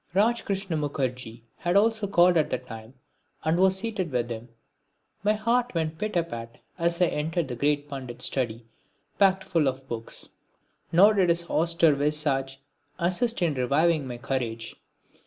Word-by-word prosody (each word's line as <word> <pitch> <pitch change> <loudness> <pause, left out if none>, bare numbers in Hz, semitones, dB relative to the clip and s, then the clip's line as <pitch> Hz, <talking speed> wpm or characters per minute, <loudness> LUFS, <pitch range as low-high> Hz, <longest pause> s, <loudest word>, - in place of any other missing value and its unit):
Rajkrishna 200 -4 +1
Mukherji 125 -5 -3
had 175 +1 -1 0.4
called 175 -1 +5
at 155 -2 +2
the - - 0
time 115 -1 -11 0.5
and 160 +2 +1
was 190 0 +4
seated 200 -4 -3
with 120 -3 -2
him. 115 +1 -6 0.7
My 210 +1 +3
heart 235 +1 0
went 160 -1 -2
pit 215 -1 -3
a 170 - +3
pat 115 -7 -8 0.2
as 170 +1 +1
I - - +7
entered 160 0 -1
the 125 - -3
great 145 +3 0
Pandit's 130 -4 -4
study, 120 -3 -1 0.5
packed 190 -1 +4
full 165 -7 +1
of 135 0 -3
books; 115 -2 -6 0.6
nor 200 +6 +6
did 190 -4 +2
his 170 0 +1
austere 165 -1 +3
visage 140 -2 -1 0.4
assist 185 +5 +1
in 165 -3 +2
reviving 140 +3 +1
my 120 -1 -6
courage. 120 -3 -3
155 Hz, 155 wpm, -26 LUFS, 130-180 Hz, 0.7 s, I